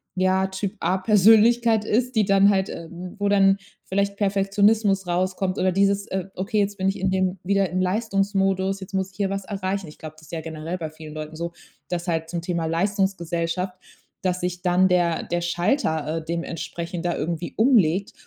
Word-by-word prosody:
ja 185 Hz, +1 st, +2 dB
Typ 190 Hz, +1 st, -4 dB
A 185 Hz, -, +1 dB
Persönlichkeit 220 Hz, +3 st, +5 dB
ist, 245 Hz, +4 st, 0 dB
die 220 Hz, -, +4 dB
dann 195 Hz, +1 st, +5 dB
halt, 190 Hz, -1 st, +1 dB
ähm, 175 Hz, +2 st, -8 dB
wo 205 Hz, -, +1 dB
dann 195 Hz, -1 st, +4 dB, 0.3 s
vielleicht 200 Hz, +1 st, 0 dB
Perfektionismus 200 Hz, 0 st, +2 dB
rauskommt 185 Hz, +1 st, -1 dB
oder 185 Hz, 0 st, +2 dB
dieses, 200 Hz, +1 st, +2 dB
äh: 190 Hz, -2 st, -3 dB
„Okay, 210 Hz, +4 st, -1 dB
jetzt 200 Hz, 0 st, 0 dB
bin 190 Hz, -1 st, 0 dB
ich 195 Hz, -, 0 dB
in 190 Hz, -, +1 dB
dem 185 Hz, 0 st, 0 dB
wieder 195 Hz, 0 st, +1 dB
im 185 Hz, +1 st, -1 dB
Leistungsmodus, 195 Hz, -1 st, 0 dB
jetzt 190 Hz, 0 st, -10 dB
muss 190 Hz, 0 st, -1 dB
ich 185 Hz, -, -23 dB
hier 200 Hz, -2 st, 0 dB
was 195 Hz, 0 st, -3 dB
erreichen.“ 195 Hz, -2 st, -3 dB
Ich 150 Hz, -, -12 dB
glaube, 155 Hz, -1 st, -9 dB
das 155 Hz, 0 st, -16 dB
ja 165 Hz, -, -3 dB
generell 160 Hz, +2 st, -5 dB
bei 160 Hz, -3 st, -5 dB
vielen 155 Hz, 0 st, -11 dB
Leuten 155 Hz, 0 st, -7 dB
so, 170 Hz, +1 st, -4 dB, 0.4 s
dass 175 Hz, 0 st, -3 dB
halt 165 Hz, -1 st, -1 dB
zum 170 Hz, -1 st, -3 dB
Thema 170 Hz, -1 st, -2 dB
Leistungsgesellschaft, 180 Hz, 0 st, -1 dB, 0.5 s
dass 185 Hz, -1 st, 0 dB
sich 180 Hz, 0 st, -3 dB
dann 180 Hz, +1 st, +3 dB
der 175 Hz, -2 st, +1 dB
der 175 Hz, 0 st, -2 dB
Schalter, 170 Hz, -, 0 dB
äh, 160 Hz, -, -11 dB
dementsprechend 170 Hz, +1 st, -4 dB
da 175 Hz, -, 0 dB
irgendwie 170 Hz, +2 st, -3 dB
umlegt 200 Hz, -, +3 dB
185 Hz, 185 wpm, -24 LUFS, 170-200 Hz, 0.5 s, Persönlichkeit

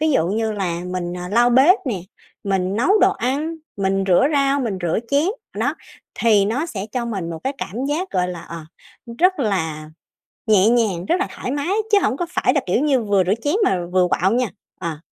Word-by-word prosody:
ví 315 Hz, 0 st, +2 dB
dụ 165 Hz, -, +2 dB
như 220 Hz, +2 st, -1 dB
là 180 Hz, -5 st, -2 dB
mình, 180 Hz, -1 st, -4 dB
ờ, 180 Hz, 0 st, -6 dB
lau 240 Hz, +5 st, +3 dB
bếp 275 Hz, +11 st, +6 dB
nè, 205 Hz, -7 st, -2 dB, 0.4 s
mình 195 Hz, -1 st, 0 dB
nấu 380 Hz, -, +3 dB
đồ -, -, +5 dB
ăn, 290 Hz, +7 st, -2 dB, 0.2 s
mình 195 Hz, 0 st, 0 dB
rửa 185 Hz, +8 st, +4 dB
rau, 280 Hz, -1 st, +2 dB
mình 215 Hz, -6 st, -2 dB
rửa 170 Hz, +2 st, 0 dB
chén, 285 Hz, +5 st, +2 dB, 0.3 s
đó, -, -, 0 dB, 0.4 s
thì 215 Hz, -4 st, +4 dB
nó 250 Hz, +11 st, -1 dB
sẽ 205 Hz, -, -5 dB
cho 245 Hz, -2 st, -2 dB
mình 195 Hz, -8 st, -4 dB
một 165 Hz, -, -5 dB
cái 265 Hz, -, 0 dB
cảm 235 Hz, +8 st, -4 dB
giác, 350 Hz, +6 st, -2 dB
gọi 180 Hz, 0 st, 0 dB
là, 175 Hz, -2 st, -6 dB
ờ, 170 Hz, -, -8 dB, 0.6 s
rất 365 Hz, +1 st, +3 dB
là 160 Hz, -, -2 dB, 0.6 s
nhẹ 210 Hz, -1 st, +5 dB
nhàng, 215 Hz, -7 st, +1 dB
rất 345 Hz, -, +2 dB
là 390 Hz, -, 0 dB
thoải 250 Hz, -, -4 dB
mái 285 Hz, +5 st, -2 dB, 0.2 s
chứ 410 Hz, -, +6 dB
hổng 260 Hz, -, 0 dB
có 350 Hz, -, -1 dB
phải -, -, +1 dB
là, -, -, +1 dB
kiểu -, -, +1 dB
như, 275 Hz, -4 st, +2 dB
vừa 205 Hz, -3 st, +2 dB
rửa 185 Hz, -, +1 dB
chén 295 Hz, +5 st, +1 dB
mà 180 Hz, -, 0 dB
vừa 185 Hz, -1 st, +3 dB
quạu 190 Hz, +2 st, +1 dB
nha. 245 Hz, 0 st, +1 dB, 0.3 s
Ờ. 165 Hz, -4 st, -4 dB
215 Hz, 220 wpm, -21 LUFS, 185-275 Hz, 0.6 s, bếp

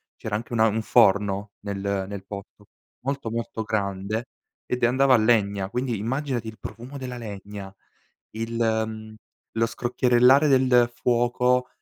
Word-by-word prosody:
c'era 105 Hz, -, -4 dB
anche 115 Hz, +3 st, -5 dB
una 110 Hz, -1 st, +4 dB
un 110 Hz, +1 st, 0 dB
forno 100 Hz, -2 st, +3 dB
nel 100 Hz, -1 st, -2 dB
nel 100 Hz, -1 st, -7 dB
posto 100 Hz, +1 st, -10 dB, 0.4 s
molto, 140 Hz, -3 st, -2 dB
molto 115 Hz, 0 st, -4 dB
grande, 105 Hz, +2 st, -2 dB, 0.4 s
ed 125 Hz, -, -3 dB
e -, -, +7 dB
andava 130 Hz, +2 st, +4 dB
a -, -, +7 dB
legna, 100 Hz, -4 st, +2 dB
quindi 125 Hz, 0 st, -2 dB
immaginati 125 Hz, +2 st, -2 dB
il 110 Hz, 0 st, -8 dB
profumo 125 Hz, +5 st, -8 dB
della 125 Hz, -2 st, -6 dB
legna, 100 Hz, -3 st, -8 dB, 0.6 s
il 115 Hz, +1 st, -4 dB
mhmm, 110 Hz, -1 st, -1 dB, 0.4 s
lo 115 Hz, -, +4 dB
scrocchierellare 125 Hz, +4 st, +3 dB
del 130 Hz, -3 st, +4 dB
fuoco 125 Hz, +1 st, +1 dB
115 Hz, 140 wpm, -25 LUFS, 105-125 Hz, 0.6 s, e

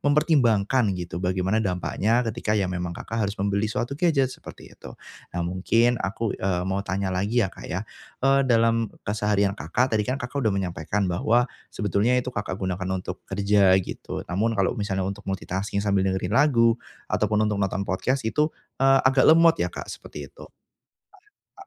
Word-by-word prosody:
mempertimbangkan 130 Hz, -, +2 dB
gitu, 85 Hz, 0 st, -5 dB
bagaimana 95 Hz, +3 st, 0 dB
dampaknya 110 Hz, +4 st, 0 dB
ketika 110 Hz, -1 st, -1 dB
ya 100 Hz, -, +1 dB
memang 90 Hz, -1 st, -3 dB
Kakak 115 Hz, 0 st, -4 dB
harus 100 Hz, -, -6 dB
membeli 100 Hz, +2 st, 0 dB
suatu 120 Hz, +4 st, -2 dB
gadget 140 Hz, -5 st, +2 dB
seperti -, -, -12 dB
itu. -, -, -11 dB, 0.5 s
Nah, 85 Hz, -, -1 dB
mungkin 115 Hz, +7 st, +2 dB
aku, 105 Hz, +2 st, -2 dB
eee, 90 Hz, -2 st, -1 dB
mau 95 Hz, +1 st, -1 dB
tanya 95 Hz, -1 st, -2 dB
lagi 105 Hz, +5 st, +1 dB
ya 95 Hz, -, -5 dB
Kak -, -, -10 dB
ya, -, -, -3 dB, 0.4 s
eee, 135 Hz, 0 st, +5 dB
dalam 115 Hz, -1 st, +3 dB, 0.2 s
keseharian 105 Hz, -1 st, +1 dB
Kakak, 125 Hz, +3 st, -1 dB
tadi 105 Hz, -, +2 dB
kan 130 Hz, -, 0 dB
Kakak 140 Hz, 0 st, -4 dB
udah 110 Hz, -, +2 dB
menyampaikan 95 Hz, +1 st, -2 dB
bahwa 110 Hz, +7 st, +2 dB, 0.3 s
sebetulnya 105 Hz, +3 st, +1 dB
itu 125 Hz, 0 st, -3 dB
Kakak 100 Hz, -3 st, -3 dB
gunakan 95 Hz, -1 st, -3 dB
untuk 90 Hz, -1 st, -6 dB
kerja 100 Hz, -1 st, +4 dB
gitu. 95 Hz, -, -4 dB
Namun 110 Hz, +5 st, -1 dB
kalau 100 Hz, -, +2 dB
misalnya 100 Hz, -4 st, -2 dB
untuk 100 Hz, +1 st, -5 dB
multitasking 95 Hz, +1 st, -3 dB
sambil 100 Hz, -1 st, +2 dB
dengerin 95 Hz, 0 st, -2 dB
lagu 115 Hz, -3 st, +4 dB, 0.3 s
ataupun 105 Hz, 0 st, +2 dB
untuk 105 Hz, -1 st, -1 dB
nonton 100 Hz, 0 st, -1 dB
podcast 125 Hz, +8 st, -1 dB
itu, 150 Hz, +7 st, +1 dB, 0.3 s
eee, 135 Hz, 0 st, +5 dB
agak 130 Hz, 0 st, +4 dB
lemot 165 Hz, +1 st, +7 dB
ya, -, -, +1 dB
Kak, -, -, -7 dB
seperti -, -, -9 dB
itu. -, -, -13 dB, 1.1 s
A -, -, -10 dB
105 Hz, 170 wpm, -25 LUFS, 95-120 Hz, 1.1 s, lemot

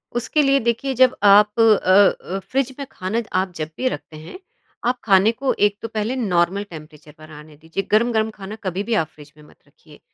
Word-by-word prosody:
उसके 240 Hz, +6 st, 0 dB
लिए 275 Hz, -1 st, +3 dB
देखिए 235 Hz, +3 st, -1 dB
जब 255 Hz, 0 st, +4 dB
आप 210 Hz, +2 st, +5 dB
अ -, -, +6 dB, 0.7 s
अ, -, -, -2 dB
फ्रिज 265 Hz, +5 st, -2 dB
में 280 Hz, -, -4 dB
खाना 190 Hz, +6 st, -3 dB, 0.2 s
आप 190 Hz, 0 st, -2 dB
जब 155 Hz, -1 st, -5 dB
भी 255 Hz, -, -1 dB
रखते 155 Hz, -, -8 dB
हैं 160 Hz, -, -11 dB, 0.5 s
आप 250 Hz, +1 st, 0 dB
खाने 200 Hz, +1 st, +4 dB
को 260 Hz, +3 st, -2 dB
एक 205 Hz, 0 st, -8 dB
तो 230 Hz, -, -4 dB
पहले 220 Hz, +3 st, -3 dB
नॉर्मल 195 Hz, -4 st, 0 dB
टेंपरेचर 155 Hz, -5 st, -13 dB
पर 155 Hz, 0 st, -15 dB
आने 150 Hz, 0 st, -13 dB
दीजिए, 160 Hz, +5 st, -5 dB
गर्म-गर्म 220 Hz, 0 st, +2 dB
खाना 200 Hz, +1 st, -8 dB
कभी 190 Hz, +1 st, -3 dB
भी 230 Hz, +2 st, -3 dB
आप 160 Hz, -7 st, +1 dB
फ्रिज 150 Hz, -1 st, -15 dB
में 150 Hz, -, -17 dB
मत -, -, -20 dB
रखिए। 150 Hz, +1 st, -20 dB
205 Hz, 205 wpm, -20 LUFS, 165-235 Hz, 0.7 s, अ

